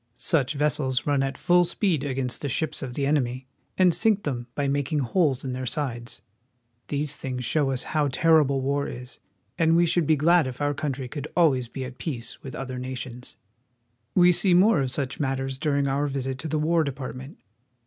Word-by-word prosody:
Such 135 +3 0
vessels 140 -3 +1
run 145 -2 +2
at 135 0 -2
full 175 0 +4
speed 175 -3 0
against 130 -3 -2
the 145 - -2
ships 155 +3 -1
of 125 -3 -6
the 140 - 0
enemy, 130 -3 0 0.3
and 185 -2 +5
sink 215 +1 +2
them 120 -4 -3
by 140 -1 0
making 140 +2 0
holes 140 0 +1
in 130 - -3
their 130 0 -4
sides. 120 -6 -3 0.6
These 145 0 -1
things 125 -3 -4
show 145 0 +1
us 130 -2 -1
how 150 -2 0
terrible 140 -1 +3
war 140 +1 0
is, 125 +1 -9 0.4
and 165 0 +4
we 170 +1 +5
should 170 -2 +1
be 155 - +5
glad 165 +1 +4
if 125 -1 -7
our 145 0 0
country 135 -3 -3
could 145 +3 -6
always 135 -8 +3
be 130 +2 -6
at 125 0 -10
peace 120 -8 -5
with 135 +1 -8
other 130 -2 -5
nations. 125 -1 -7 0.8
We 180 -1 +6
see 180 +1 +3
more 185 -3 +5
of 130 - -1
such 135 0 -3
matters 135 -2 -2
during 140 -2 +1
our 140 +2 0
visit 135 -1 -3
to 160 - -4
the 155 0 -1
War 160 +2 +2
Department. 135 -1 -6
140 Hz, 195 wpm, -25 LUFS, 130-155 Hz, 0.8 s, We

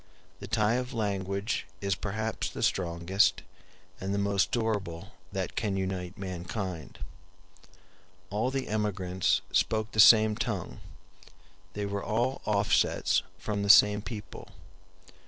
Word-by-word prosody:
The 100 - -8
tie 110 +1 +2
of 125 -1 -8
language 100 -1 -2
is 100 0 0
perhaps 110 +3 -3
the - - -5
strongest 90 +3 +1 0.6
and 95 +1 -2
the - - -1
most 100 -1 +1
durable 105 -8 -2 0.2
that - - -4
can 100 -2 -1
unite 95 0 -4
mankind. 90 - -5 1.3
All 110 +5 0
the 135 0 -3
emigrants 95 -4 0
spoke 110 0 +1
the 110 - -4
same 110 0 +8
tongue; 105 -6 -4 0.9
they 105 0 -3
were 100 0 -3
all 120 +5 -1
offsets 100 -1 +2 0.2
from 105 -1 -3
the 100 - -2
same 105 0 +7
people. 105 -1 -8
100 Hz, 120 wpm, -29 LUFS, 95-110 Hz, 1.3 s, same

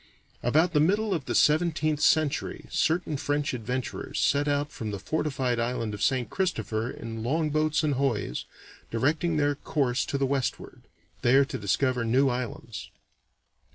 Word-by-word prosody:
About 160 +8 +2
the 150 - +4
middle 200 +6 +2
of 155 -7 -2
the - - -2
seventeenth 155 -1 +3
century 155 0 +1
certain 160 -2 +1
French 145 +1 -1
adventurers 125 +2 -4
set 145 +1 +2
out 145 0 0
from 110 -5 -5
the 100 - -3
fortified 130 0 -1
island 115 -2 -1
of 105 - -6
St. 130 -3 +1
Christopher 115 - -1
in 115 -2 -6
longboats 155 +4 +1
and 150 -2 +2
hoys, 125 - -1 0.4
directing 155 +7 +1
their 145 -1 +2
course 135 -3 0
to 140 - -1
the 135 - +1
westward, 135 -1 -2 0.4
there 135 +3 +5
to - - -7
discover 125 +4 +1
new 130 +4 +3
islands. 120 -2 -5
140 Hz, 150 wpm, -27 LUFS, 120-155 Hz, 0.4 s, there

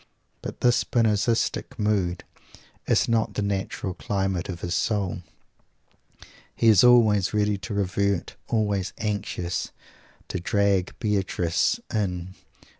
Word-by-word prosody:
But - - -7
this 120 -1 +3
Spinozistic 115 +3 0
mood 100 -5 0 0.6
is - - +3
not 115 -2 0
the 105 - -1
natural 95 -1 -2
climate 95 -2 -2
of 85 -2 -5
his 85 - -2
soul. 95 0 -1 1.3
He 115 - +4
is 105 -4 +6
always 110 -5 +5
ready 105 -1 +1
to 105 - -6
revert, 100 -1 -1
always 105 -4 0
anxious 100 -5 -3 0.6
to 95 - -2
"drag 100 0 +1
Beatrice 100 - 0
in." 95 -4 -2
100 Hz, 115 wpm, -25 LUFS, 95-110 Hz, 1.3 s, is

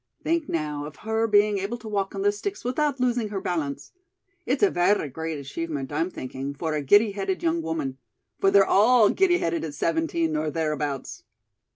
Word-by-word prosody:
Think 330 -1 0
now, 150 -2 -2
of 150 0 -9
her 220 +1 +1
being 205 -1 +3
able 200 +5 -3
to 225 -1 -11
walk 200 -2 -2
on 195 - -2
those 205 0 +1
sticks 400 - -4
without 275 +2 0
losing 245 -3 0
her 200 -2 -3
balance. 160 -7 -3 0.6
It's - - +1
a 400 - +5
verra 180 -2 +2
great 160 +3 -4
achievement, 145 0 -5
I'm 160 +4 0
thinking, 135 -2 -6
for 160 +2 -2
a 150 - -1
giddy 205 +9 +5
headed 195 -1 -3
young 165 0 +1
woman. 155 -5 -3 0.4
For 195 - +4
they're 195 0 +6
all 220 +3 +5
giddy 370 -2 +3
headed 165 - -1
at 150 -3 -5
seventeen 165 +1 0
or 155 0 0
thereabouts." 150 -3 -3
170 Hz, 190 wpm, -25 LUFS, 155-210 Hz, 0.6 s, they're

